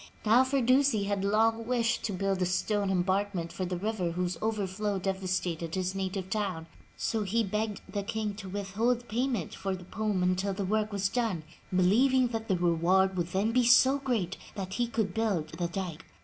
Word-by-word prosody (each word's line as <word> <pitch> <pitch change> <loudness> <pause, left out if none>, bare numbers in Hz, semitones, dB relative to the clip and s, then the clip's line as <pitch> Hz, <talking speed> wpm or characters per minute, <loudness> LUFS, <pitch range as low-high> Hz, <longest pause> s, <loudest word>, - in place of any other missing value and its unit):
Now, 230 +4 +6
Firdusi 260 -3 +3
had 200 -1 -1
long 225 +2 +2
wished 230 -3 +1
to 215 - -1
build 195 0 -1
a - - +3
stone 200 +2 0
embankment 190 -1 0
for 185 - -3
the 180 0 -3
river 190 -3 -2
whose 180 0 -1
over 215 -2 0
flow 200 +2 -2
devastated 185 -3 -2
his 185 0 -1
native 190 -1 -3
town, 190 -6 -2 0.3
so 225 - -1
he 220 +3 +1
begged 210 0 -2
the 205 - -3
King 215 0 -3
to 195 -3 -7
with 195 0 -5
hold 240 +4 +1
payment 235 - -1
for 195 0 -3
the 185 - -10
poem 205 -1 -1
until 185 +2 +1
the 195 - -2
work 215 +2 0
was 200 -1 0
done, 220 -7 -1 0.3
believing 245 +8 +4
that 225 -1 -4
the 190 - +2
reward 175 +3 +3
would 175 -2 -1
then 195 +5 0
be 250 +1 +3
so 260 +3 +6
great 225 -9 -1 0.2
that 190 -2 -5
he 240 +2 0
could 220 -5 -1
build 195 -8 0
the 175 +1 -3
dike. 175 -3 -5
200 Hz, 190 wpm, -29 LUFS, 185-225 Hz, 0.3 s, Now